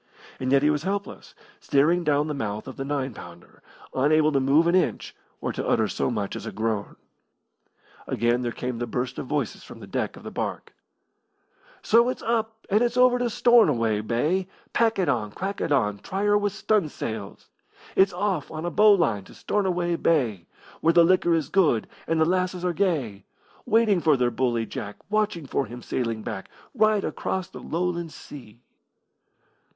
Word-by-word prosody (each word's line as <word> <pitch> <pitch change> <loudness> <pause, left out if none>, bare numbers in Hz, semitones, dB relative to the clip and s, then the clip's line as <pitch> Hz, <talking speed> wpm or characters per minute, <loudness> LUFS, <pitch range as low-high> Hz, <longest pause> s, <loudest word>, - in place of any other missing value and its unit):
And 130 0 -2
yet 140 0 +4
he 150 - +4
was 150 -1 -1
helpless, 200 +3 -5 0.2
staring 165 +6 +2
down 150 -2 +2
the 150 - -2
mouth 110 -5 -4
of 130 - -7
the 135 - -4
nine 135 -2 -2
pounder, 85 -3 -13 0.3
unable 155 +3 +3
to 140 - +2
move 140 +5 +4
an 170 - +2
inch 185 - 0 0.2
or - - -3
to - - -4
utter 110 -2 +2
so - - -1
much 105 -5 -3
as - - -6
a - - -4
groan. 110 -2 -2 1.1
Again 120 +2 +1
there 120 -1 -2
came 125 0 -4
the 120 - -2
burst 125 +2 -3
of - - -6
voices 145 -5 -2
from - - -12
the - - -9
deck - - -3
of - - -13
the - - -7
barque. - - -4 1.1
So 235 +2 +4
it's 255 - -5
up 225 -1 -2
and 210 +2 +2
it's 240 0 +1
over 250 0 +5
to 245 -1 0
Stornoway 120 - +3
Bay, 150 - 0 0.3
Pack 225 -1 +2
it 185 -3 +1
on! 115 -7 0
Crack 195 +2 -4
it - - -2
on! 105 -7 +1
Try 195 - -4
her 205 0 +3
with 205 -1 +1
stunsails! 150 - -2 0.5
It's 190 +1 +5
off 180 -4 -2
on 155 +1 -5
a 175 - -2
bowline 195 - +4
to - - -15
Stornoway 180 -4 -1
Bay, 120 - +1 0.3
Where 165 - +3
the 170 - +7
liquor 175 -1 +3
is 155 -4 -1
good 155 - +2 0.2
and 165 0 +1
the 160 - +4
lasses 180 +1 0
are 180 - +1
gay, 145 - -1 0.4
Waiting 220 -4 +3
for 155 -4 +4
their 125 -1 +1
bully 120 -2 0
Jack, 105 -1 -6 0.2
Watching 210 -7 0
for 135 -1 -1
him 120 +2 -9
sailing 115 -3 -2
back, 95 -3 -6 0.2
Right 215 -4 +3
across 190 -1 -3
the - - -10
Lowland 170 -1 -2
Sea. 120 -7 -12
155 Hz, 185 wpm, -25 LUFS, 120-190 Hz, 1.1 s, the